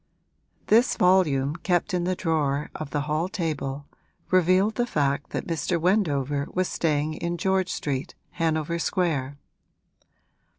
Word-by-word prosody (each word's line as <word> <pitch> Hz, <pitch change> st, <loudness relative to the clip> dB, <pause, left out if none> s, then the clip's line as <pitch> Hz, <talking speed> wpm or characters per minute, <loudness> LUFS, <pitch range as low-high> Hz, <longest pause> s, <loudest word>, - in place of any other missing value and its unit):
This 230 Hz, +4 st, +4 dB
volume, 155 Hz, -6 st, +3 dB
kept 175 Hz, +1 st, 0 dB
in 175 Hz, -1 st, 0 dB
the 185 Hz, +1 st, 0 dB
drawer 150 Hz, -5 st, -1 dB
of 155 Hz, -, -6 dB
the 145 Hz, -, -1 dB
hall 155 Hz, +4 st, -1 dB
table, 150 Hz, -8 st, -3 dB, 0.5 s
revealed 185 Hz, +3 st, +4 dB
the 240 Hz, +1 st, -1 dB
fact 140 Hz, -, 0 dB
that -, -, -4 dB
Mr. 165 Hz, +1 st, -1 dB
Wendover 145 Hz, -7 st, +1 dB
was 185 Hz, 0 st, +1 dB
staying 155 Hz, -2 st, 0 dB
in 170 Hz, +2 st, -3 dB
George 190 Hz, 0 st, +1 dB
Street, 140 Hz, +3 st, -3 dB, 0.2 s
Hanover 165 Hz, 0 st, -1 dB
Square. 145 Hz, -6 st, -1 dB
165 Hz, 130 wpm, -25 LUFS, 145-185 Hz, 0.5 s, This